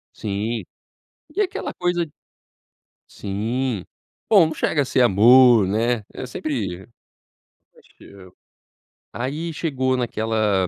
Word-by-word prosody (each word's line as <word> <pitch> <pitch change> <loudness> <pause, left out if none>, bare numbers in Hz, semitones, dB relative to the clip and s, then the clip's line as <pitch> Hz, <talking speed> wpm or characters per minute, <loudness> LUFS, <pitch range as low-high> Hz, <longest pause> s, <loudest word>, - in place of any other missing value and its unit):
Sim. 105 +2 -3 0.7
E 405 - -1
aquela 385 -3 -2
coisa 175 -1 -1 1.0
sim. 110 +2 -3 0.5
Bom, 195 -7 +7
não 160 - -4
chega 150 -1 0
a - - -2
ser 130 0 +1
amor, 120 +1 +6
né, 115 +3 0
eu - - -7
sempre 115 - -4 0.9
acho - - -24
que - - -17
eu 95 -2 -15 0.8
aí, 150 +7 -4
chegou 130 -5 -1
naquela 110 -5 0
120 Hz, 110 wpm, -22 LUFS, 105-145 Hz, 1.0 s, Bom